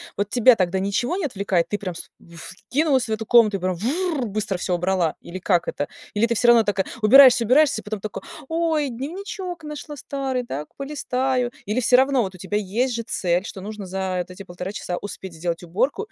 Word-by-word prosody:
Вот 205 +1 -2
тебя 245 0 +6
тогда 185 -1 0
ничего 240 - -1
не 385 - -1
отвлекает? 195 -8 0
Ты 205 - -2
прям 185 -4 -5
вс - - -9 0.3
вскинулась 260 - -1
в - - -3
эту 220 +1 -2
комнату, 220 -3 +5
и - - -10
прям 185 0 -1
вр-р-р, 280 - -1
быстро 205 -2 -2
всё 180 0 -1
убрала. 180 -2 0
Или 185 +2 -8
как 175 -2 +1
это? 145 - -3 0.2
Или 210 +2 +2
ты 235 0 0
всё 240 - +2
равно 235 -1 +7
так 200 -2 0 0.2
убираешься 250 +2 +8
убираешься 260 0 +3
и - - -25
потом 210 0 -4
такой: 215 +1 -6 0.3
"Ой, 325 -2 0
дневничок 345 - -6
нашла 300 0 -7
старый, 265 -2 -3
так 150 - -5
полистаю". 260 -3 -1
Или 215 +5 0
всё 250 +2 +5
равно 265 0 +3
вот 190 - -5
у 185 - -12
тебя 195 +3 -2
есть 225 +6 -1
же 230 - -3
цель, 180 -5 0
что 195 - -8
нужно 210 +1 -7
за 190 0 -2
вот 180 +1 -5
эти 195 +2 -9
1,5 180 +1 -6
часа 180 -3 -4
успеть 190 -3 -7
сделать 165 +1 -3
уборку, 210 - 0
215 Hz, 210 wpm, -23 LUFS, 190-260 Hz, 0.3 s, убираешься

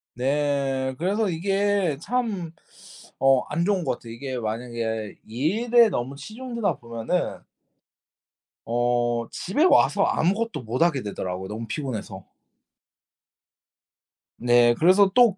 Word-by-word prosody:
네. 135 0 0
그래서 200 +5 0
이게 195 -1 0
참 215 -8 -2 0.7
어 135 -2 +4
안 160 +3 0
좋은 195 -5 +1
것 125 - -1
같아요. 115 -1 -10
이게 130 +1 -5
만약에 110 -1 -4
일에 220 - +3
너무 130 -4 -3
치중되다 230 - -3
보면은 115 -1 -3 1.2
어 120 0 0
집에 205 - 0
와서 365 - +4
아무것도 210 - 0
못 120 +5 -3
하게 165 -6 +3
되더라고요 95 -3 -5
너무 110 +2 -5
피곤해서. 130 -2 -5 2.1
네. 120 0 +4
그래서 190 +4 +5
또 235 -5 +5
140 Hz, 230 characters per minute, -24 LUFS, 120-195 Hz, 2.1 s, 그래서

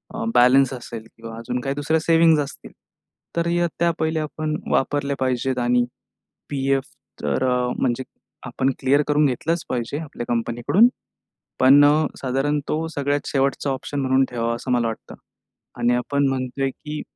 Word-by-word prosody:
अ, 225 - -3
balance 135 +2 +5
असेल 120 -3 -7
किंवा 115 0 -9
अजून 120 +2 -3
काही 135 +2 -2
2ऱ्या 145 +3 +1
सेव्हिंग्ज 165 -1 +4
असतील, 140 -1 -8 0.6
तर 170 0 0
या 175 0 +1
त्या 170 0 +3
पहिल्या 160 0 0
आपण 155 0 -3 0.2
वापरल्या 140 +1 0
पाहिजेत. 130 0 0
आणि 120 0 +2 0.6
पी-एफ 135 -1 0 0.4
तर 75 - 0
अ, 125 0 +1
म्हणजे 130 0 0 0.4
आपण 130 +2 0
क्लिअर 140 +2 +3
करून 150 0 +3
घेतलंच 165 +6 -2
पाहिजे 125 +2 -2
आपल्या 145 -6 -6
कंपनीकडून. 120 - +3 0.7
पण 135 +3 +7 0.4
साधारण 135 +3 0
तो 160 +1 -1
सगळ्यात 145 0 -1
शेवटचा 140 0 0
ऑप्शन 140 +2 -3
म्हणून 130 0 +3
ठेवावा, 115 -1 -1
असं 120 +2 -6
मला 120 -1 +2
वाटतं. 115 - -7 0.7
आणि 120 +1 +3
आपण 140 +3 +1
म्हणतोय 135 +1 -2
की 150 +3 -7
135 Hz, 150 wpm, -22 LUFS, 125-150 Hz, 0.7 s, पण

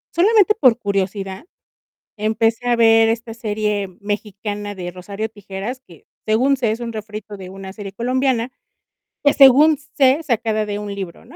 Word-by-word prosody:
Solamente 425 +3 +4
por 250 -5 +4
curiosidad, 195 - -3 0.7
empecé 225 +3 0
a 240 - +3
ver 225 -1 +5
esta 230 0 -3
serie 210 -3 -2
mexicana 205 0 -4
de 180 -2 -6
Rosario 200 +4 -6
Tijeras, 205 +4 -7
que, 170 -4 -18 0.2
según 255 +6 +2
sé, 240 -4 0
es 220 - -3
un 235 -1 -5
refrito 215 -1 -7
de 185 -1 -9
una 190 0 -9
serie 200 -2 -8
colombiana, 255 +1 0 0.7
que, 285 - +4
según 285 +3 +7 0.2
sé, 270 +2 +4
sacada 225 -5 0
de 205 0 -4
un 205 -1 -5
libro, 190 -4 -7
¿no? - - -15
220 Hz, 160 wpm, -20 LUFS, 205-245 Hz, 0.7 s, según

